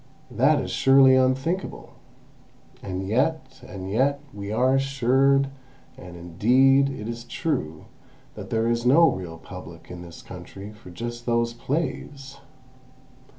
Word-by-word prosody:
That - - +3
is - - -4
surely 135 0 +6
unthinkable. 135 +8 0 0.9
And 95 0 -4
yet—and 130 -6 -2
yet—we 130 -4 -1
are 125 +4 +2
assured, 135 +1 +2 0.5
and, 90 -1 -11
indeed, 130 +11 +3
it 115 -6 -6
is 115 0 -5
true, 80 - -3 0.5
that - - -9
there 115 0 0
is 120 0 0
no 150 +7 +6
real 85 -3 -6
Public - - -11
in 90 -1 -8
this 85 -1 -11
country 100 +2 -10
for 105 -3 -14
just 120 +6 -7
those 115 0 +1
plays! 135 0 -4
120 Hz, 120 wpm, -24 LUFS, 100-135 Hz, 0.9 s, surely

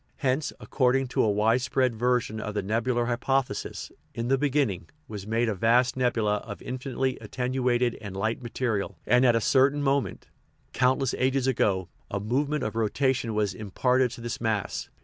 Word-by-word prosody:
Hence, 140 +1 0
according 130 0 +1
to - - +1
a 110 - +3
widespread 115 +4 +2
version 120 -2 0
of 105 -1 -5
the 105 - -1
nebular 120 +4 0
hypothesis, 125 -2 -1 0.2
"in 115 +1 -2
the 135 - +4
beginning" 135 - 0 0.2
was 105 -2 -7
made 115 +2 +1
a 110 - +1
vast 120 +6 +3
nebula 115 -5 +1
of 105 0 -8
infinitely 130 0 -3
at - - -11
tenuated 125 -1 0
and 100 -3 -7
light 110 +5 -1
material, 115 -6 -2
and 125 +2 +4
at 120 - +4
a - - +3
certain 140 +4 +3
moment 135 -8 0 0.3
(" - - -41
countless 130 0 +2
ages 130 0 +1
ago") 100 -8 +1 0.2
a 100 - -2
movement 140 +8 -1
of 110 - -3
rotation 120 +1 0
was 105 -3 +1
imparted 125 +6 +1
to 120 - -9
this 120 -1 -5
mass. 110 -4 -2
120 Hz, 170 wpm, -27 LUFS, 110-130 Hz, 0.3 s, the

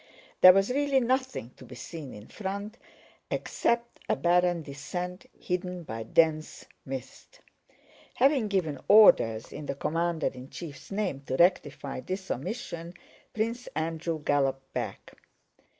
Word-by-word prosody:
There 185 - +12
was 195 +5 +2
really 280 0 +2
nothing 260 - -1
to - - -13
be 125 - -11
seen 150 0 -8
in 105 0 -10
front 200 +2 -5 0.5
except 235 0 -1
a - - +3
barren 175 -1 +2
descent 175 +6 -6
hidden 180 -1 -3
by 115 -7 -6
dense 155 +6 +1 0.2
mist. 135 - -8 0.8
Having 265 -3 +3
given 170 -9 -1
orders 115 - +6
in 150 -1 -7
the 140 - -2
commander 165 +3 -1
in 130 +1 -10
chief's 150 -6 -9
name 195 -9 -2
to 130 - -1
rectify 145 -6 +2
this 185 +6 -5
omission, 170 - -5 0.4
Prince 230 +3 -2
Andrew 160 +1 -2
galloped 135 -2 0
back. - - -5
175 Hz, 130 wpm, -28 LUFS, 145-205 Hz, 0.8 s, There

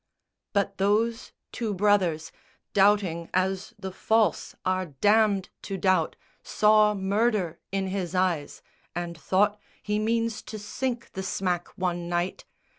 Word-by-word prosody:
But 200 -1 0
those 220 +4 +1 0.2
two 220 -4 -2
brothers, 185 -5 +2 0.4
doubting 195 -4 +3
as 190 +4 0
the 190 -2 -6
false 220 0 +1
Are 185 0 0
damned 205 +6 +2
to 195 - -4
doubt, 185 -4 +2 0.3
saw 210 0 +4
murder 200 -2 0
in 195 0 0
his 185 -2 -3
eyes, 180 -5 0 0.3
And 175 -1 -3
thought 205 +5 +1 0.2
"He 210 0 0
means 230 0 0
to 215 - -8
sink 235 +4 -4
the 190 - -5
smack 180 -2 -1
one 175 -2 -2
night." 175 +1 -2
195 Hz, 125 wpm, -27 LUFS, 180-210 Hz, 0.4 s, saw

